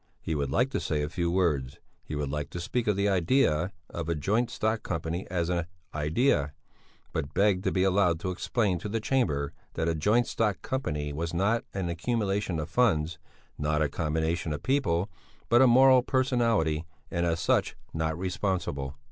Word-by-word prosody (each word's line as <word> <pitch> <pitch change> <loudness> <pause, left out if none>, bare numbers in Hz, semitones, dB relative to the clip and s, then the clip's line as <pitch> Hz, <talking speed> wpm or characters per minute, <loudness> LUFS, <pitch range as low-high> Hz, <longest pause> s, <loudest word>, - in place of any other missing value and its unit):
He 80 - -3
would 70 -3 -1
like 125 - +1
to - - -1
say 75 -3 -1
a 75 - -2
few 85 +2 -1
words. 80 -8 0 0.3
He 75 - -6
would 75 -2 -2
like 75 -1 -3
to 85 - -6
speak 115 +8 -2
of 105 - +3
the 100 +1 +1
idea 95 - +2 0.2
of 85 -1 -4
a 85 - +1
joint 105 +11 +1
stock 110 +1 -1
company 85 +2 -3
as 85 -2 -1
an 85 -2 -1 0.3
idea, 75 - +1 0.6
but 70 +1 -3
begged 100 -2 +3
to - - +2
be 95 - +2
allowed 95 -3 +3
to 95 - -2
explain 95 0 0
to 105 - -5
the 115 +2 -1
Chamber 85 - 0 0.2
that 80 0 0
a 85 - +2
joint 105 +10 +2
stock 105 -3 -1
company 75 - -2
was 85 +3 -3
not 100 +6 +1
an 95 -3 -1
accumulation 100 0 -1
of 75 - -3
funds, 80 -7 +1 0.4
not 75 +1 +1
a 75 - 0
combination 80 +2 -1
of 75 - -6
people, 100 -10 +1 0.4
but 120 +1 +6
a 130 - +7
moral 130 +1 +7
personality, 115 - +1 0.3
and 85 0 0
as 85 -1 0
such - - +1 0.2
not 80 0 -1
responsible.... 90 -7 -2
85 Hz, 185 wpm, -28 LUFS, 80-105 Hz, 0.6 s, a